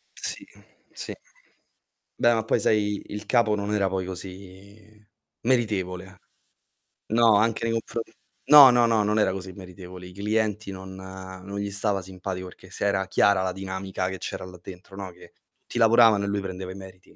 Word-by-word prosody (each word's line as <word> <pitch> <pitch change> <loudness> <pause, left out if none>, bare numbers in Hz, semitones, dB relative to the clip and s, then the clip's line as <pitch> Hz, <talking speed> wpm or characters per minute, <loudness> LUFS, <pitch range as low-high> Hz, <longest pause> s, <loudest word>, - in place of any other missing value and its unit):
Sì, - - -5 0.5
sì. - - -6 1.0
Beh 120 0 +4
ma 110 -1 0
poi 115 - +2
sai 105 -1 +1
il 105 +1 -6
capo 115 -2 +3
non 105 +1 -2
era 100 -2 +2
poi 95 -1 -2
così 100 +3 -11 0.3
meritevole. 95 -6 -1 0.9
No, 115 -1 +5
anche 115 +1 +1
nei 115 - 0
confro 115 +1 -2 0.5
no 145 -4 +11
no 120 -1 +4
no 110 -2 +3
non 105 +1 +1
era 95 -3 +3
così 95 0 -6
meritevole. 90 -1 -10
I 90 - -13
clienti 105 0 -1
non 95 0 -9
non 95 +1 -9
gli 100 0 -3
stava 100 -1 -1
simpatico, 95 0 -6
perché 90 0 -14
se 100 - -4
era 95 -1 +1
chiara 100 0 +3
la 95 - -1
dinamica 95 0 -4
che 95 - -5
c'era - - -5
là 90 -1 -12
dentro, 95 +1 -11
no? 95 -2 -6
Che 90 - -17 0.3
ti - - -6
lavoravano 115 -3 +5
e - - -3
lui 100 0 -1
prendeva 95 -1 -6
i - - -9
meriti. 95 -1 -13
100 Hz, 175 wpm, -25 LUFS, 95-105 Hz, 1.0 s, no